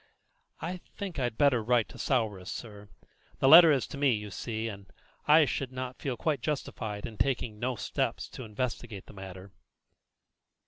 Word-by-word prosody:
"I 180 +2 -4 0.2
think 190 -7 -5
I'd 120 -3 -1
better 135 -6 +4
write 120 0 +2
to - - -12
Souris, 105 -8 -1
sir; 105 -3 -8 0.5
the 135 - +2
letter 165 +2 +10
is 135 -4 +2
to 140 - -7
me, 140 -3 +4
you 105 -1 -4
see, 110 +3 -3
and 100 -3 -9 0.4
I 155 +1 +7
should 135 -2 -3
not 130 0 -6
feel 130 -4 -2
quite 145 0 -1
justified 110 -7 -3
in 110 - -9
taking 120 -5 0
no 125 +2 -1
steps - - -2
to 130 - -8
investigate 115 -2 -4
the - - -14
matter." 95 0 -9
120 Hz, 170 wpm, -30 LUFS, 105-135 Hz, 0.5 s, letter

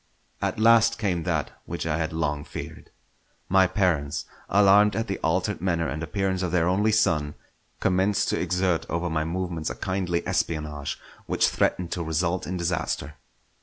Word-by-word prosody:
At - - -1
last 115 0 +5
came 90 -6 -1
that - - -1 0.2
which - - -4
I 80 -1 0
had 80 -1 -1
long 75 -2 -1
feared. - - -8 0.6
My 95 0 +5
parents, 85 -8 0 0.2
alarmed 100 +1 +5
at 115 - 0
the 95 - -4
altered 90 +5 0
manner 85 -3 0
and 75 +4 -4
appearance 95 +2 -1
of 90 -2 -1
their 85 -1 +2
only 100 +4 +2
son, 75 -9 +1 0.4
commenced 95 +2 +1
to - - 0
exert 90 -2 0
over 85 +1 -1
my 80 -1 0
movements 85 -1 -3
a - - -5
kindly 90 +2 -2
espionage 75 -3 -2 0.3
which - - +2
threatened 90 -2 0
to 90 - -2
result 85 +3 -1
in 90 +1 -3
disaster. 85 -4 -2
90 Hz, 165 wpm, -25 LUFS, 80-95 Hz, 0.6 s, last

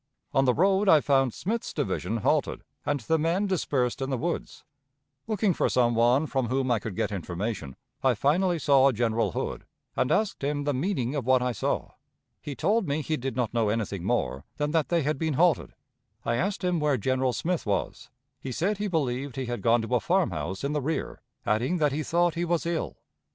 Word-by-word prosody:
On 135 - +3
the 125 - +4
road 195 +4 +3
I 155 - +8
found 135 -2 +2
Smith's 220 - -3
division 115 - -2
halted, - - +1 0.2
and 145 -2 0
the 160 +8 +1
men 170 +6 +1
dispersed 140 -10 0
in 135 - -2
the 130 - 0
woods. 170 +7 -4 0.6
Looking 210 -3 +1
for - - +1
some 120 -2 +3
one 120 +6 +3
from 135 -5 -1
whom 130 +1 0
I 115 - +3
could 105 -3 -6
get - - -1
information, 90 - -4 0.3
I 130 -2 +4
finally 170 - +2
saw 140 -2 +5
General 115 -4 0
Hood, - - -3 0.3
and 125 - +1
asked 210 -8 0
him 145 +1 -1
the 145 0 0
meaning 135 -3 -1
of 140 -5 -3
what 130 -1 +4
I 125 - 0
saw. - - -2 0.5
He 145 - -6
told 205 - +1
me 145 +2 -1
he 155 - -1
did 135 -4 -4
not 120 -3 -1
know 115 -3 +2
anything 105 -4 -2
more 65 -5 -1
than 150 0 -1
that 160 -2 +1
they 170 -3 +2
had 150 0 -1
been 160 -3 0
halted. 170 +2 +2 0.5
I 115 - +1
asked 195 - -1
him 180 -2 +1
where 150 -3 +2
General 130 +3 +1
Smith 170 +1 -2
was; 100 -2 -2 0.3
he 135 - -6
said 195 - -1
he 210 - -1
believed 140 -6 -1
he 135 -1 -3
had 120 0 -4
gone 115 0 +3
to 115 - -4
a - - +3
farmhouse 160 - -1
in 140 +1 -1
the 150 - 0
rear, 155 +4 -3 0.2
adding 120 +11 +1
that 150 -3 +2
he 150 +3 -2
thought 170 +2 +1
he 170 +1 -2
was 170 -1 0
ill. 170 -1 -2
140 Hz, 210 wpm, -27 LUFS, 120-165 Hz, 0.6 s, I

